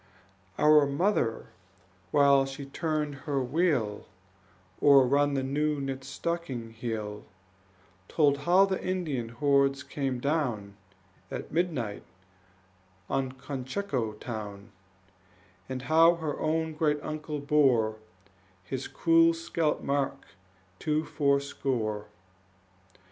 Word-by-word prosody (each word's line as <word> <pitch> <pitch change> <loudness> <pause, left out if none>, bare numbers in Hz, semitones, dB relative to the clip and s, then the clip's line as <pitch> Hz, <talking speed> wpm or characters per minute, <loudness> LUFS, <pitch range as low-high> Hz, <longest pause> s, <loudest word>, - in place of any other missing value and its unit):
Our 150 -1 +6
mother, 140 - 0 0.6
while 140 +2 +4
she 135 +1 -7
turned 150 +1 -2 0.2
her 135 -2 +1
wheel 130 - 0 0.7
Or 140 -2 +7
run 140 +2 +2
the 135 - 0
new 150 +2 0
knit 135 -1 -4
stocking 135 -4 -4
heel, 110 -2 -5 0.8
Told 145 -3 +2
how 180 +6 +5
the 190 -1 -3
Indian 155 -11 -2
hordes 140 +2 +2
came 135 -3 -3
down 120 -9 -1 0.5
At - - -6
midnight 150 - -1 1.1
on 135 -1 -1
Cocheco 130 - -3
town, 105 -2 -7 1.0
And 130 -1 -4
how 165 +3 +5
her 160 -3 -4
own 160 0 0
great 150 -1 +1
uncle 155 0 -4
bore 135 -7 +2 0.7
His 130 +8 -5
cruel 165 0 +4
scalp 165 -2 -1
mark 140 -1 -2 0.5
to 155 0 0
fourscore. 135 -8 -1
140 Hz, 100 wpm, -28 LUFS, 125-155 Hz, 1.1 s, Or